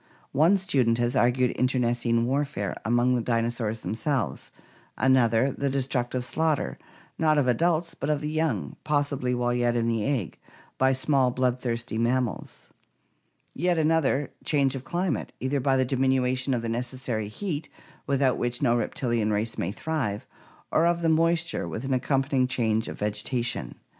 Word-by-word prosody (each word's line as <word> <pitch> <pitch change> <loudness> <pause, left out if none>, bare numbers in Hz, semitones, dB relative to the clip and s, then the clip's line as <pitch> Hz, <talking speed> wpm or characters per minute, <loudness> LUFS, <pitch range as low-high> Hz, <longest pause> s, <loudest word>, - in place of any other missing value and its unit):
One 165 +7 +4
student 130 -11 +1
has 120 +2 0
argued 125 0 +3
internecine 120 -2 +1
warfare 135 -7 -1
amongst 120 +2 +2
the - - -1
dinosaurs 115 -1 -1
themselves; 115 - -2 0.5
another, 130 -1 +3
the 140 +1 -2
destructive 130 -2 -1
slaughter, 160 +2 0 0.4
not 155 -1 +3
of 145 - +3
adults 165 +6 +1
but 140 -2 -4
of 150 -1 +1
the 150 +1 -3
young, 155 - -1
possibly 145 -4 0
while 120 0 0
yet 120 -1 +1
in 115 -1 +1
the 115 -2 0
egg, 125 - -2 0.4
by 130 0 +4
small 130 -1 +2
bloodthirsty 120 -2 -1
mammals; 120 -2 -2 0.8
yet 175 +2 +1
another, 155 -3 +2
change 140 -4 +2
of 135 -2 -5
climate, 175 +5 -2
either 135 +2 -1
by* 135 +1 +2
the 130 - +3
diminution 130 0 +1
of 115 - -3
the - - -2
necessary 120 -2 -3
heat 155 - -4 0.4
without 135 -2 +2
which 120 0 -1
no 120 -4 +2
reptilian 120 -3 0
race 105 +2 -1
may 85 - -2
thrive, 115 -6 -3 0.5
or 165 +2 +3
of 170 0 0
the 165 - +3
moisture 165 +1 +1
with 115 - -5
an 135 - 0
accompanying 135 0 +1
change 110 -3 0
of - - -6
vegetation. 105 - -2
130 Hz, 155 wpm, -26 LUFS, 120-145 Hz, 0.8 s, One